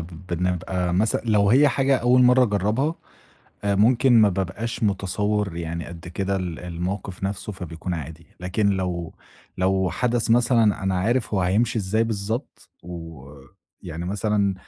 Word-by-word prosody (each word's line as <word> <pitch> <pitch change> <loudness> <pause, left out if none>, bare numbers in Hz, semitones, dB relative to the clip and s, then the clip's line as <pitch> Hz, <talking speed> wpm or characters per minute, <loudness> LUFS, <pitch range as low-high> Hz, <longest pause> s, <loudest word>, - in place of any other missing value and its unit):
بنبقى 90 +1 -2
مثلًا 105 +4 +1
لو 105 -3 +3
هي 140 +5 +6
حاجة 135 0 +2
أول 125 +1 +4
مرّة 125 +1 +6
أجرّبها، 110 - 0 0.7
آآ 100 - +2
ممكن 120 +5 +4
ما 105 - +6
بابقاش 100 +5 -3
متصوِّر 105 -1 0
يعني 85 -1 -4
قد 85 +1 -9
كده 95 +3 -2
ال 90 -3 -4
المَوقف 90 +2 -5
نَفْسه 100 +2 -3
فبيكون 90 -1 -5
عادي، 80 +1 -8
لكن 90 +3 0
لو 90 -4 -2 0.4
لو 95 0 +1
حدث 120 +1 0
مثلًا 115 -4 +3
أنا 95 0 0
عارف 115 +2 0
هو 95 - +2
هيمشي 110 +6 +1
إزاي 110 +3 +1
بالضبط 110 +4 -4
ويعني 80 +1 -10
مثلًا 100 0 0
95 Hz, 140 wpm, -23 LUFS, 90-110 Hz, 0.7 s, هي